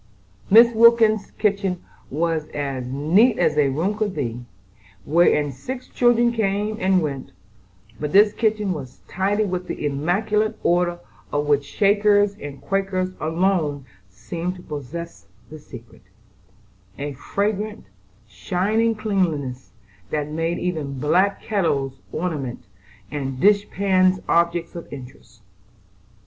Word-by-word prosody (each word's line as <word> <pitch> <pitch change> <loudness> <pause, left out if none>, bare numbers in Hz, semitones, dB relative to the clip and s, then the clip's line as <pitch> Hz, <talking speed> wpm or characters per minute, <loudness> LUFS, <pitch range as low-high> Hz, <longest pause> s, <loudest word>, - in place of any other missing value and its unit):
Mrs. 235 +3 +7
Wilkins's 225 -2 +5
kitchen 200 -4 -1 0.2
was 160 +1 -1
as 135 -3 -3
neat 165 - +3
as 155 - +2
a 145 -2 +3
room 165 +10 -1
could 210 -3 -2
be, 120 -4 -3 0.6
wherein 150 -2 +3
six 250 - -7
children 240 -1 +3
came 210 -1 -1
and 185 -3 +2
went, 135 -11 -5 0.7
but 150 0 -3
this 205 +1 +6
kitchen 210 -3 0
was 135 -6 -9
tidy 200 +3 0
with 180 -2 -3
the - - -4
immaculate 195 +9 0
order 175 0 +2 0.3
of 145 0 0
which 145 -1 +2
Shakers 205 0 +3
and 145 -1 -8
Quakers 195 -1 -1
alone 160 -3 0 0.2
seem 170 - -5
to 180 - -13
possess 150 - -7 0.2
the 155 - -9
secret,—a 100 -1 -13
fragrant, 205 +8 -3 0.4
shining 200 - 0
cleanliness, 160 - -2 0.4
that 150 -1 -2
made 165 +2 -2
even 155 -6 -3
black 185 +9 +1
kettles 140 -10 -1
ornamental 150 - -4 0.5
and 135 -3 -4
dish 205 +3 +4
pans 185 -1 +2
objects 170 0 +1
of 170 - -8
interest. 125 -4 -12
170 Hz, 120 wpm, -22 LUFS, 140-200 Hz, 0.7 s, Mrs